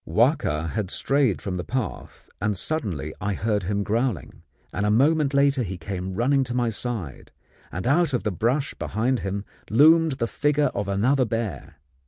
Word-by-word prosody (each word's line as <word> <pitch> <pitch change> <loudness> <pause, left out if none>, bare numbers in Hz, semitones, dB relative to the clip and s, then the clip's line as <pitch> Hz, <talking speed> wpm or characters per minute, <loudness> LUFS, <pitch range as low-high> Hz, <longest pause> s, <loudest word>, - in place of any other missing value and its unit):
Wahka 75 +2 +1
had 105 -4 -2
strayed 130 - +1
from 90 -2 -3
the 90 - -3
path, 125 -4 -5
and 105 -1 0
suddenly 90 - -2
I 100 -1 -1
heard 105 0 0
him 100 +2 -1
growling; 110 - -2 0.3
and 105 - -1
a 105 - +2
moment 140 +6 +3
later 140 -1 +3
he 95 -5 -4
came 95 +1 -5
running 135 +5 +2
to 120 -1 -4
my 120 -2 +1
side, 105 - -5 0.4
and 90 - -5
out 160 +5 +3
of 125 - -1
the 105 - 0
brush 125 - 0
behind 120 +4 -1
him 100 +1 -4 0.2
loomed 160 +6 +5
the 125 -3 -1
figure 145 +4 +1
of 100 - -2
another 125 +7 +2
bear. 115 -2 -4
115 Hz, 175 wpm, -24 LUFS, 100-135 Hz, 0.4 s, loomed